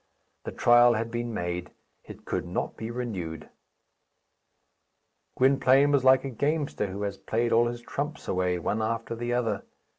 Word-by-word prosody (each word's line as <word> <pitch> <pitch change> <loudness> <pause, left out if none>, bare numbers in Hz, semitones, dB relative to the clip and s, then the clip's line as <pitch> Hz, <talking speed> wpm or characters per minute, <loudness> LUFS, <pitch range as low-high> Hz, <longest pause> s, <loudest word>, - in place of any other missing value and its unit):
The - - -4
trial 120 0 +5
had 115 +1 -3
been 120 0 -3
made. 90 -3 -3 0.4
It - - -12
could - - -3
not - - -3
be 110 - -6
renewed. 100 -10 -5 1.9
Gwynplaine 135 +1 +4
was 140 -3 +3
like 130 0 +5
a 135 - -4
gamester 145 -3 -1
who 100 +2 -5
has 100 -1 -4
played 115 +1 -1
all 120 +1 +4
his 120 0 -5
trumps 145 +5 -5
away, 90 -1 0
one 105 +6 -2
after 115 +1 -2
the 120 +1 -4
other. 115 -4 0
120 Hz, 155 wpm, -27 LUFS, 105-130 Hz, 1.9 s, trial